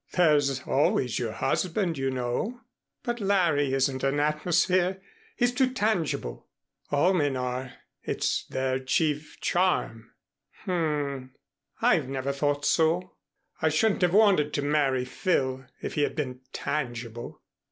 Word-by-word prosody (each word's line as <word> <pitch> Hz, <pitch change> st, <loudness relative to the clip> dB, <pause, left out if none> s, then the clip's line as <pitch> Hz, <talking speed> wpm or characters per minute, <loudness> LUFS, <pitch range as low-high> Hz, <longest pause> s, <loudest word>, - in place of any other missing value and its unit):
"There's 145 Hz, -6 st, +3 dB
always 130 Hz, -4 st, +1 dB
your 115 Hz, -3 st, -2 dB
husband, 170 Hz, -, 0 dB
you 135 Hz, -1 st, -1 dB
know." 130 Hz, -, -2 dB, 0.4 s
"But 240 Hz, 0 st, -2 dB
Larry 175 Hz, -9 st, +2 dB
isn't 135 Hz, 0 st, 0 dB
an 135 Hz, +1 st, +1 dB
atmosphere. 175 Hz, +5 st, +2 dB, 0.4 s
He's 245 Hz, -1 st, +2 dB
too 255 Hz, 0 st, +2 dB
tangible." 175 Hz, -, -1 dB, 0.4 s
"All 145 Hz, +6 st, +3 dB
men 145 Hz, -6 st, +1 dB
are. 125 Hz, 0 st, -3 dB, 0.3 s
It's -, -, -1 dB
their 130 Hz, 0 st, -1 dB
chief 150 Hz, +3 st, -1 dB
charm." 175 Hz, -11 st, 0 dB, 0.5 s
"H -, -, -8 dB
m. 145 Hz, -6 st, -1 dB, 0.5 s
I've -, -, +3 dB
never 135 Hz, +1 st, -2 dB
thought 145 Hz, +1 st, 0 dB
so. 170 Hz, +3 st, +2 dB, 0.5 s
I 160 Hz, -, +3 dB
shouldn't 195 Hz, +8 st, +2 dB
have 180 Hz, +1 st, +3 dB
wanted 195 Hz, -9 st, +4 dB
to 145 Hz, -, 0 dB
marry 140 Hz, -3 st, +1 dB
Phil 130 Hz, -2 st, -1 dB, 0.2 s
if -, -, -3 dB
he 150 Hz, -, 0 dB
had 145 Hz, -, 0 dB
been 130 Hz, -5 st, -3 dB
tangible." 120 Hz, -5 st, -4 dB
145 Hz, 130 wpm, -27 LUFS, 130-175 Hz, 0.5 s, wanted